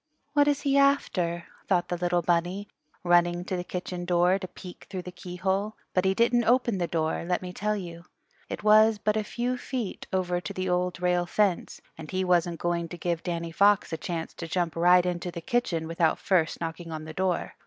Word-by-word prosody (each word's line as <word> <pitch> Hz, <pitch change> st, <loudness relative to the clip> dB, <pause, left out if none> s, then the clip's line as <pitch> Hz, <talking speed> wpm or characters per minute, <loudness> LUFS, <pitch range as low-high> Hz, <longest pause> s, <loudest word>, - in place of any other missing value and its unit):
"What 290 Hz, -1 st, +4 dB
is 285 Hz, -1 st, +2 dB
he 280 Hz, -1 st, +3 dB
after?" 180 Hz, -12 st, +1 dB, 0.2 s
thought 175 Hz, -2 st, +1 dB
the 175 Hz, -, 0 dB
little 175 Hz, 0 st, 0 dB
bunny, 175 Hz, +4 st, 0 dB, 0.4 s
running 175 Hz, 0 st, +3 dB
to 185 Hz, -, -2 dB
the 180 Hz, -, -3 dB
kitchen 180 Hz, 0 st, -5 dB
door 175 Hz, +2 st, +3 dB
to 185 Hz, -, -6 dB
peek 180 Hz, 0 st, -12 dB
through 185 Hz, -2 st, -5 dB
the 180 Hz, -, -7 dB
keyhole. 190 Hz, +4 st, -2 dB, 0.2 s
But 185 Hz, 0 st, +2 dB
he 190 Hz, 0 st, +2 dB
didn't 235 Hz, +1 st, +3 dB
open 235 Hz, -4 st, +2 dB
the 175 Hz, -, 0 dB
door, 160 Hz, -1 st, -1 dB
let 180 Hz, +1 st, -1 dB
me 180 Hz, 0 st, -6 dB
tell 210 Hz, +3 st, -1 dB
you. 170 Hz, -3 st, -7 dB, 0.4 s
It -, -, -5 dB
was 215 Hz, +1 st, +6 dB
but 210 Hz, +1 st, 0 dB
a 215 Hz, -, 0 dB
few 245 Hz, +3 st, -2 dB
feet 245 Hz, -8 st, -4 dB
over 180 Hz, -1 st, 0 dB
to 200 Hz, -, -6 dB
the 185 Hz, -1 st, -3 dB
Old 180 Hz, 0 st, 0 dB
Rail 180 Hz, -1 st, +2 dB
Fence, 195 Hz, -2 st, 0 dB, 0.2 s
and 155 Hz, -1 st, -8 dB
he 190 Hz, 0 st, -1 dB
wasn't 175 Hz, -2 st, +1 dB
going 170 Hz, -1 st, -1 dB
to 175 Hz, -, -7 dB
give 170 Hz, 0 st, -2 dB
Danny 170 Hz, -2 st, -3 dB
Fox 200 Hz, +1 st, +3 dB
a -, -, -1 dB
chance 165 Hz, 0 st, -4 dB
to 165 Hz, -, -7 dB
jump 170 Hz, 0 st, -1 dB
right 175 Hz, +1 st, +5 dB
into 180 Hz, 0 st, -2 dB
the 170 Hz, -1 st, -6 dB
kitchen 170 Hz, -5 st, -1 dB
without 165 Hz, -1 st, +1 dB
first 175 Hz, -4 st, +1 dB
knocking 165 Hz, 0 st, -5 dB
on 155 Hz, -1 st, -5 dB
the 155 Hz, -, -8 dB
door. 185 Hz, -1 st, -1 dB
180 Hz, 210 wpm, -27 LUFS, 170-200 Hz, 0.4 s, was